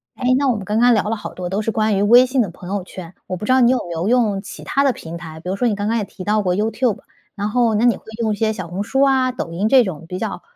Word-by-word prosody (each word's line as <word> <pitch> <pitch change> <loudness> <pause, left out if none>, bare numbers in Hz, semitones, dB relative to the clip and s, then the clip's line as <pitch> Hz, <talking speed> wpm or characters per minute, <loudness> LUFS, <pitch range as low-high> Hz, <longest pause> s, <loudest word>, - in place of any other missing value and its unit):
诶， 255 -1 +1
那 280 0 +1
我 250 - +2
们 205 - -5
刚 210 +3 -1
刚 245 +1 +5
聊 215 - +2
了 225 - 0
好 210 - -8
多 180 -1 -5
都 195 +3 -1
是 225 - -1
关 215 -2 +1
于 - - +1
微 240 +5 +6
信 255 0 +1
的 210 - -1
朋 175 +1 -11
友 200 0 -2
圈， 180 -2 -10
我 185 - -3
不 180 - -9
知 210 - 0
道 260 - +5
你 240 -2 +5
有 260 - +2
没 175 - -7
有 165 +3 -2
用 220 -5 +2
其 - - -10
它 275 - 0
的 275 -2 +3
平 165 -4 -8
台？ 160 -2 -10
比 180 - -6
如 190 - -2
说 245 - +1
你 215 - 0
刚 205 +1 -2
刚 230 - +1
也 215 - -1
提 190 - -10
到 210 +2 +1
过 180 -3 0
YouTube， 220 +2 0 0.4
然 205 0 -2
后 230 -1 +2
那 215 - +1
你 240 -2 +4
会 - - -21 0.2
用 220 -1 +1
一 - - -1
些 220 +1 +1
小 185 -5 -7
红 180 +3 -4
书 270 +6 0
啊， 265 -2 +3
抖 175 - -5
音 185 +6 -1
这 255 +2 +6
种 170 -6 -6
比 180 - -5
较 - - -4
210 Hz, 390 characters per minute, -20 LUFS, 185-245 Hz, 0.4 s, 微